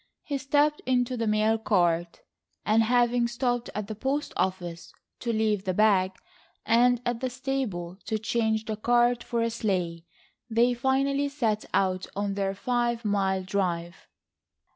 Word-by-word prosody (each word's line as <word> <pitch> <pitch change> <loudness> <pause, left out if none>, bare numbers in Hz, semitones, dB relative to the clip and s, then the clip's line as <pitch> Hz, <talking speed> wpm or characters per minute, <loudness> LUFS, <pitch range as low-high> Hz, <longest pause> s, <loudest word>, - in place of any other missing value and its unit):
He 280 -2 -3
stepped 290 +2 +2
into 250 -1 +1
the 230 -2 -2
mail 215 +1 +2
cart, 175 -5 +1 0.4
and 220 +2 +4
having 240 +1 +3
stopped 245 0 -1
at 210 0 -2
the 215 - -5
post 270 +7 -2
office 175 -2 -3 0.3
to 235 - -2
leave 215 -3 +1
the 185 -1 -1
bag, 195 -3 +3 0.5
and 245 +1 +4
at 240 -1 -1
the 260 0 -2
stable 245 -9 -3
to 220 - 0
change 220 0 0
the 215 -1 -3
cart 240 +2 +2
for 235 -1 -1
a 230 - 0
sleigh, 180 -7 -2 0.5
they 235 +2 +3
finally 275 +3 +1
set 230 -7 -1
out 185 -1 +1
on 200 0 -1
their 195 0 -1
five 240 +1 -1
mile 195 -2 +1
drive. 180 -3 -2
220 Hz, 150 wpm, -27 LUFS, 195-245 Hz, 0.5 s, and